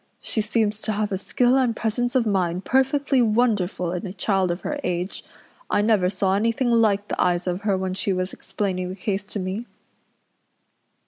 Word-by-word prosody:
She 220 - 0
seems 215 0 0
to 215 - -1
have 210 0 -1
a 190 - 0
skill 245 +5 +2
and 250 -4 +2
presence 240 +3 -1
of 250 -3 +3
mind 185 -3 0
perfectly 270 +1 +2
wonderful 210 -6 +1
in 180 +3 -4
a - - -6
child 195 -2 +1
of 175 +2 -2
her 300 - -3
age. 180 +1 -2 0.5
I 205 - +2
never 210 -5 +3
saw 190 0 0
anything 230 +4 +1
like 210 -3 +3
the - - -2
eyes 175 0 +1
of 180 +1 -2
her 200 -2 +1
when 185 0 -2
she 195 +1 -1
was 185 0 -2
explaining 185 -3 -3
the 185 - -5
case 195 0 -2
to 210 - -6
me." 195 +6 -4
205 Hz, 190 wpm, -23 LUFS, 185-230 Hz, 0.5 s, of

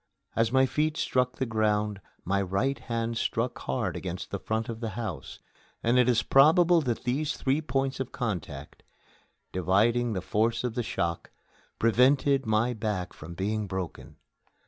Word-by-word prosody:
As 115 0 +2
my 130 +1 +5
feet 155 +3 0
struck 125 -1 +1
the 130 - -1
ground 105 -2 0 0.2
my 100 +2 +1
right 100 +9 0
hand 115 -1 -2
struck 120 +2 -1
hard - - -2
against - - -5
the - - -3
front 110 +1 -2
of 115 -1 -5
the 115 -2 -3
house, 110 -7 -5 0.5
and 120 +2 +3
it 125 0 +4
is 115 -2 +3
probable 165 +6 +5
that 120 -5 -2
these 140 +5 -1
three 135 +3 +1
points 135 -2 -1
of 130 -1 -3
contact, 85 - -5 0.7
dividing 110 +6 +2
the 95 - -2
force 115 +5 0
of 125 -2 -2
the 120 - -1
shock, 85 -6 -2 0.5
prevented 135 +3 +3
my 110 +3 +2
back 105 -5 -3
from 85 +3 -10
being 105 +3 -2
broken. 95 -3 -6
115 Hz, 160 wpm, -28 LUFS, 105-130 Hz, 0.7 s, my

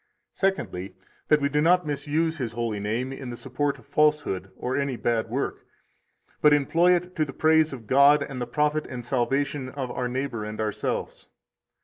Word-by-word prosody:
Secondly, 100 - -2 0.3
that 150 -1 +4
we 140 - +2
do 150 +1 +1
not 180 +2 +4
misuse 150 +3 -1
His 120 -3 -3
holy 115 -3 -2
name 115 +6 -2
in 135 -2 -7
the 120 - -6
support 140 +3 -2
of - - -18
falsehood 150 -11 +1
or 125 +1 -2
any 140 -2 -1
bad 115 -1 -1
work, 135 +4 -3 0.8
but 150 -1 +6
employ 165 +5 +4
it 180 +1 -4
to 155 - +2
the 145 - -4
praise 160 +1 +3
of 125 -5 -8
God 140 +5 +5
and 130 -2 -6
the 120 - -2
profit 150 +4 0
and 120 -2 -7
salvation 135 +2 -1
of 130 -2 -5
our 125 - -2
neighbor 125 -3 -3
and 105 +1 -6
ourselves. 105 -1 -3
135 Hz, 185 wpm, -26 LUFS, 120-150 Hz, 0.8 s, but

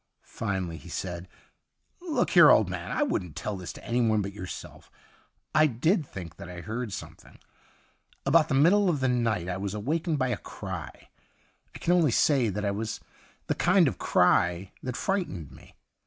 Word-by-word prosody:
Finally 95 -6 -3
he 70 - -12
said: 90 -1 -5 0.4
' - - -45
Look 340 -4 0
here, - - +8
old - - +6
man, - - -5
I 300 - +1
wouldn't 90 - -2
tell 105 - -3
this 90 -2 -6
to - - -13
anyone 115 -3 +2
but 100 0 -5
yourself 90 -3 -9 0.6
I 155 0 +5
did 150 - +1
think 85 -4 -9
that 85 - -9
I 90 -1 -7
heard 110 +3 -4
something. - - -9 0.9
About 155 +3 +4
the 135 - 0
middle 185 +8 +5
of 155 -5 0
the 130 - +1
night 115 -8 0
I 90 +1 -2
was 100 +1 -4
awakened 155 - -1
by 130 -2 0
a 120 - -1
cry; - - -8 0.7
I - - -5
can 175 - +1
only 170 -4 +4
say 125 0 +3
that 105 +1 -3
it 100 - 0
was 110 +2 -4 0.5
the - - 0
kind - - +4
of - - -3
cry 90 +1 +2
that 125 -1 -4
frightened 175 - -2
me. - - -16
115 Hz, 185 wpm, -27 LUFS, 95-150 Hz, 0.9 s, here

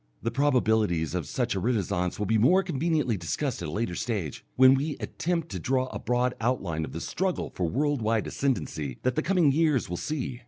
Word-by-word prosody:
The 115 - 0
probabilities 110 - +2
of 85 -6 -2
such - - -1
a 95 - -1
renascence 95 -5 0
will 105 - -1
be 110 +2 +2
more 180 - +5
conveniently 155 - 0
discussed 85 -4 -2
at - - -3
a - - -5
later 105 +1 -2
stage, 100 - -3
when 130 0 +7
we 145 +2 -1
attempt 170 -1 -2
to - - -4
draw 130 0 0
the - - -4
broad 125 +1 +1
outline 95 -10 -1
of - - -9
the 80 - -5
struggle 185 - -2
for 90 -3 -1
world 145 - 0
wide 110 0 +1
ascendency 80 - -2
that 130 - +2
the - - 0
coming 175 -5 +3
years 150 - +1
will 90 - -2
see. 130 - -3
120 Hz, 205 wpm, -27 LUFS, 95-145 Hz, -, when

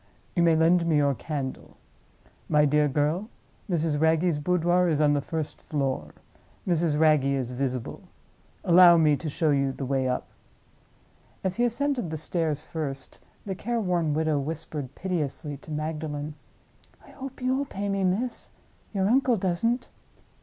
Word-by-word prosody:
You 175 - +2
may 165 -1 +5
lend 170 +2 +3
me 160 -2 +3
your 140 -1 +3
candle. 135 -1 -5 0.7
My 150 0 +4
dear 150 +1 +3
girl, 150 - 0 0.4
Mrs. 160 -4 0
Wragge's 160 0 +2
boudoir 180 +2 +2
is 155 -3 +1
on 150 -1 +4
the 145 - +1
first 155 0 -4
floor; 135 -3 -3 0.5
Mrs. 165 -4 +1
Wragge 155 -3 +4
is 135 -3 -1
visible. 125 -1 -3 0.6
Allow 175 0 +7
me 155 -2 +4
to 155 +3 -5
show 155 +1 +1
you 140 -1 +2
the 135 - -5
way 135 0 0
up." 125 - -1 1.2
As 190 +1 -1
he 240 - +3
ascended 245 - 0
the 160 - -3
stairs 155 -1 -1
first, 140 -5 -5 0.3
the 195 - -2
care 235 +5 -2
worn 175 -7 0
widow 155 -2 +1
whispered, 145 -2 -5
piteously, 150 -5 -3
to 145 - -16
Magdalen, 155 -1 -4 0.7
"I - - -16
hope 270 -1 -8
you'll 260 +2 0
pay 205 -6 -4
me, 195 -1 0
miss. 210 +7 -1 0.5
Your 190 -1 +2
uncle 250 +1 +3
doesn't." 205 +7 -1
160 Hz, 155 wpm, -26 LUFS, 145-180 Hz, 1.2 s, Allow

